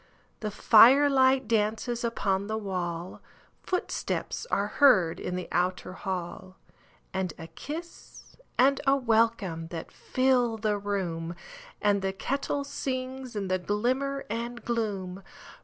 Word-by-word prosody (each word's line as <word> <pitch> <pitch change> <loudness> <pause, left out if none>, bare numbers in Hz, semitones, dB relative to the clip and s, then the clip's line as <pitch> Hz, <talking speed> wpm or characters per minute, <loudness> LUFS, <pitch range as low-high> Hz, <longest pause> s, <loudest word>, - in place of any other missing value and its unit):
The 215 - -3
firelight 260 +4 +6
dances 225 +2 0
upon 200 -4 0
the 220 0 -2
wall, 180 -4 -4 0.4
Footsteps 370 +5 -3
are 200 - +1
heard 205 - +4
in 180 - -3
the 180 - -4
outer 180 +1 -1
hall, 185 0 -5 0.6
And 190 -3 -2
a 160 - -8
kiss 320 - -9 0.2
and 270 +2 +4
a 275 - +6
welcome 225 -9 +1
that 165 -1 -7
fill 255 -3 +1
the 210 -1 0
room, 175 -5 -3 0.5
And 205 -1 +3
the 190 0 -1
kettle 275 +7 -2
sings 260 -2 -4
in 200 -2 -2
the 185 0 0
glimmer 255 +9 -1
and 235 +2 -5
gloom. 200 -5 -2
215 Hz, 125 wpm, -28 LUFS, 190-255 Hz, 0.6 s, firelight